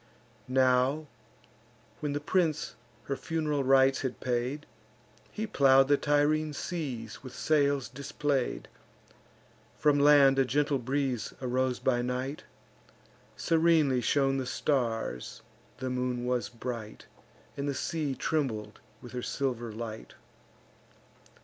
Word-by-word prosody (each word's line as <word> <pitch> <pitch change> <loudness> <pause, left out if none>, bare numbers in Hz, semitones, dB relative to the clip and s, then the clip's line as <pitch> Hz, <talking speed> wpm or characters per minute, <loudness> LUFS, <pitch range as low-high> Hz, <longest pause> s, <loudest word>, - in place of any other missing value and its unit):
Now, 130 +3 +2 0.9
when 145 -1 -2
the 145 - -1
prince 155 -1 0 0.3
her 140 - -3
fun'ral 150 -2 -1
rites 135 0 +4
had 130 - -3
paid, 125 +4 -2 0.7
He 220 - -3
plow'd 135 -8 +4
the 145 - +6
Tyrrhene 150 +1 +1
seas 130 -11 -5
with 130 -2 -10
sails 145 -3 +2
display'd. 140 0 -2 1.1
From 145 -1 +3
land 140 -2 +6
a - - +6
gentle 145 +1 +1
breeze 130 -1 -2
arose 130 0 0
by 120 -2 +1
night, 125 +4 -3 0.9
Serenely 160 -6 +3
shone 135 +2 +2
the 130 -2 -3
stars, 115 - -2 0.3
the 130 0 -3
moon 125 -1 -2
was 125 -1 -1
bright, 115 -3 -7 0.5
And 140 +1 -2
the 140 - -2
sea 145 0 -2
trembled 110 -11 -2 0.2
with 120 - -9
her 125 - -4
silver 120 -4 -2
light. 110 0 -7
135 Hz, 115 wpm, -29 LUFS, 125-145 Hz, 1.1 s, the